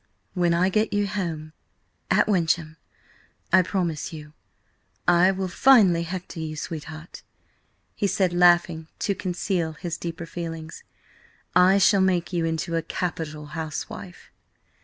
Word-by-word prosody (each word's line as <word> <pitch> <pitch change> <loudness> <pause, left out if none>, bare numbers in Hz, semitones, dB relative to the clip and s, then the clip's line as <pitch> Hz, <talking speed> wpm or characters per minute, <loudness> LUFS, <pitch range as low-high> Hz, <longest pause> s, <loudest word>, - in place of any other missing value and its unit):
"When 175 -2 +1
I 180 +2 +3
get 215 +3 0
you 205 0 +1
home 165 -6 -4 0.6
at - - +4
Wyncham, 165 -5 0 0.8
I 185 - +8
promise 175 -4 -2
you 150 -2 -10 0.7
I 175 +1 +5
will 190 0 -1
finely 195 -4 +5
hector 175 0 -6
you, 155 -1 -4
sweetheart," 155 +1 -7 0.7
he 205 - -1
said, 190 -2 +1
laughing 175 -2 +4
to 200 - 0
conceal 180 -3 -2
his 170 +1 -5
deeper 170 0 -5
feelings. 165 -2 -7 0.7
"I 180 +2 +6
shall 195 0 +4
make 185 -1 +1
you 170 -2 0
into 165 +1 -2
a 165 - +1
capital 160 -3 -4
housewife!" 160 -3 -7
175 Hz, 130 wpm, -25 LUFS, 160-185 Hz, 0.8 s, I